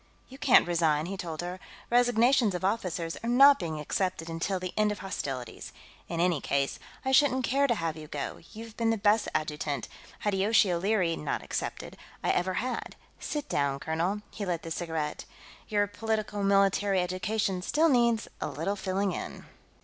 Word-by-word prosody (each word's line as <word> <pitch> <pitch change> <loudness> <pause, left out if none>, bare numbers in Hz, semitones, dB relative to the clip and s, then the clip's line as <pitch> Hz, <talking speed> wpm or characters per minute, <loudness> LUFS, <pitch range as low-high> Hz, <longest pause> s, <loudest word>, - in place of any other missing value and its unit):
"You 265 +1 -12
can't 250 - +5
resign," 160 -3 +2
he 195 +3 -4
told 170 -4 -5
her. 180 +1 -5 0.3
"Resignations 245 -2 +4
of 180 - -2
officers 180 -5 -1
are 230 - -1
not 275 +3 +7
being 160 -4 -3
accepted 165 +1 -2
until 175 +4 -1
the 185 0 -5
end 215 0 +2
of 210 - -4
hostilities. 135 - -5 0.4
In 170 - -3
any 170 -4 +2
case, 140 0 -1 0.3
I 265 - +1
shouldn't 265 -1 +4
care 275 +3 +2
to 235 - +2
have 165 -5 -2
you 155 -1 -9
go; 145 -1 -5
you're 225 +1 -8
the 225 -1 +1
best 210 +1 +3
adjutant, 150 -2 -2 0.3
Hideyoshi 205 0 +3
O'Leary 180 -1 +1
not 150 - -3
excepted, - - -4 0.3
I - - +2
ever 185 +1 0
had. 250 +5 -3 0.2
Sit 295 -1 -4
down, 140 -1 0
colonel." 170 +8 -1
He 210 - -6
lit 175 -4 -2
the 165 - -7
cigarette. 160 -3 -3 0.4
"Your 205 -1 +2
politico 215 0 -2
military 195 0 +3
education 185 +1 -1
still 310 - +2
needs 235 -5 +3
a - - -1
little 200 - -2
filling 195 0 -1
in. - - -6
195 Hz, 170 wpm, -29 LUFS, 165-220 Hz, 0.4 s, not